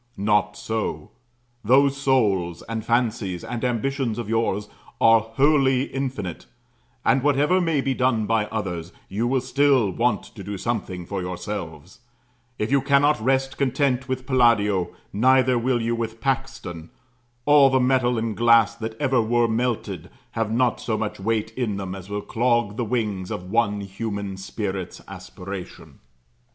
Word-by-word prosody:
Not 105 0 +1
so. 110 -2 -3 0.5
Those 135 +5 +4
souls, 105 -11 +1
and 115 -1 -3
fancies, 110 -6 0
and 120 0 -5
ambitions 125 -1 -1
of 120 -3 -4
yours, 110 -2 0 0.3
are 115 0 +6
wholly 135 +3 +2
infinite; 130 - -4 0.6
and, 135 - +4
whatever 145 +6 +3
may 165 -5 +1
be 135 0 0
done 125 -4 +1
by 110 -1 +1
others, 90 -6 -4 0.2
you 110 +5 -1
will 130 +1 +1
still 135 -7 +2
want 115 +1 0
to 100 - -11
do 100 +1 -5
something 95 -5 -3
for 95 +1 -4
yourselves; 90 -1 -6 0.6
if 105 +4 -2
you 140 -1 +4
cannot 145 +1 +3
rest 135 +2 0
content 135 -1 0
with 130 0 -3
Palladio, 105 -8 +3 0.2
neither 130 +3 +4
will 120 -1 0
you 115 +1 0
with 115 -1 -4
Paxton: 130 -10 -3 0.6
all 145 -2 +6
the 130 0 +3
metal 125 -1 +2
and 110 -1 -2
glass 115 -1 +5
that 110 0 -7
ever 130 -4 +2
were 120 +1 +2
melted 110 -6 -2 0.2
have 115 -1 -2
not 120 +1 +1
so 110 -2 -1
much 105 -2 -4
weight 110 +2 -1
in 115 -4 -2
them 95 -2 -5
as 95 0 -9
will 105 0 -3
clog 120 -3 +1
the 120 - -1
wings 105 -5 -2
of 90 +1 -6
one 105 -3 +1
human 100 0 -5
spirit's 95 -1 -5
aspiration. 95 0 -9
115 Hz, 150 wpm, -23 LUFS, 100-130 Hz, 0.6 s, are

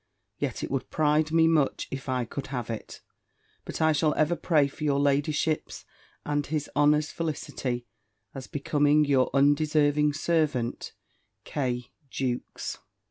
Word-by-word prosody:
Yet - - -3
it - - -4
would 135 -2 -2
pride 155 0 +2
me 165 0 +5
much, 155 -4 +1
if 135 -1 -5
I 125 -2 0
could 135 +3 -6
have 125 -4 -4
it. 110 - -7 0.6
But - - -3
I 160 - +5
shall 155 0 +2
ever 155 +3 +2
pray 155 -5 +2
for 145 +2 -9
your 140 -2 +2
ladyship's 145 +2 0 0.4
and 145 0 0
his 150 -1 -2
honour's 150 +1 +3
felicity, 140 -6 -3 0.5
as 135 -1 -8
becomes 145 +1 +2
your 135 -2 +3
undeserving 145 +1 +3
servant, 150 -6 -1 0.5
"K. 125 -4 -3 0.2
JEWKES." 125 -2 -4
145 Hz, 135 wpm, -27 LUFS, 135-155 Hz, 0.6 s, me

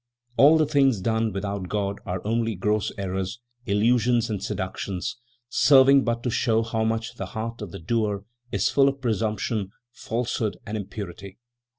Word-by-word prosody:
"All 145 +7 +7
the 155 - +3
things 135 -6 +3
done 110 +3 0
without 100 -1 -4
God 100 -1 -2
are 90 0 -4
only 115 0 0
gross 105 +3 0
errors, 95 +2 -3 0.3
illusions 115 +2 +2
and 100 -3 -3
seductions, 95 -2 -3 0.3
serving 135 +1 +6
but 115 0 -1
to 125 - -1
show 115 -1 +2
how 110 0 -1
much 115 +2 -2
the - - -4
heart 115 +1 -4
of 105 - -5
the - - -8
doer 105 +2 -1 0.3
is - - +1
full 140 -1 +5
of 140 0 -5
presumption, 110 -3 -1 0.2
falsehood 115 -2 -2
and 105 - -4
impurity. 100 -2 -7
110 Hz, 160 wpm, -25 LUFS, 100-120 Hz, 0.3 s, All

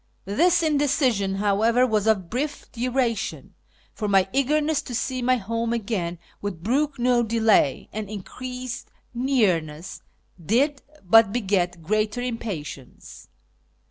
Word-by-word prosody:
This 335 - +3
indecision, 265 -10 +1
however, 215 +5 +3
was 215 -3 0
of 200 -5 +2
brief 280 - -4
duration, 240 -2 -2 0.4
for 215 - -3
my 195 -2 +4
eagerness 295 +2 +1
to 245 - -6
see 255 +2 -2
my 255 +1 +3
home 230 +1 -2
again 200 -7 -2 0.2
would 185 -5 -5
brook 280 +6 0
no 245 0 +3
delay, 225 - +2
and 210 -1 -5
increased 250 +4 -6 0.2
nearness 190 - 0 0.4
did 275 - +1 0.2
but 220 +3 +6
beget 190 -6 0
greater 215 +5 0
impatience. 205 - -6
230 Hz, 115 wpm, -24 LUFS, 195-255 Hz, 0.4 s, but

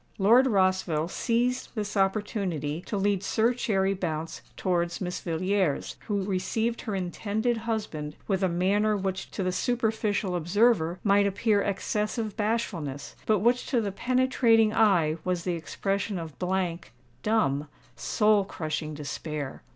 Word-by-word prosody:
Lord 235 +7 +5
Rossville 185 -6 +1
seized 245 +5 -1
this 210 -1 -3
opportunity 195 -6 -1
to 210 - -2
lead 200 -1 +1
Sir 225 +4 +2
Cherry 195 -5 +1
Bounce 165 -4 -4 0.2
towards 175 -2 0
Miss 180 -2 -3
Villiers, 180 -1 0
who 205 -3 0
received 220 +5 -1
her 215 -4 -3
intended 205 +5 -1
husband 155 -9 -3
with 195 -2 0
a 190 - +2
manner 200 +5 +2
which 190 -1 -3
to 195 - -3
the 185 - 0
superficial 220 -3 0
observer 175 0 +2
might 200 -1 +4
appear 205 +1 +2
excessive 210 +2 -2
bashfulness, 195 - -2
but 215 -3 +3
which 245 +3 +2
to 255 - +2
the 205 -3 -1
penetrating 235 -1 +3
eye 175 -9 +3
was 180 -2 -1
the 180 - -1
expression 195 +4 -2
of 165 -3 -7
blank—dumb—soul 165 - -1
crushing 155 -3 -4
despair. 150 -1 -5
195 Hz, 130 wpm, -27 LUFS, 170-215 Hz, 0.2 s, Lord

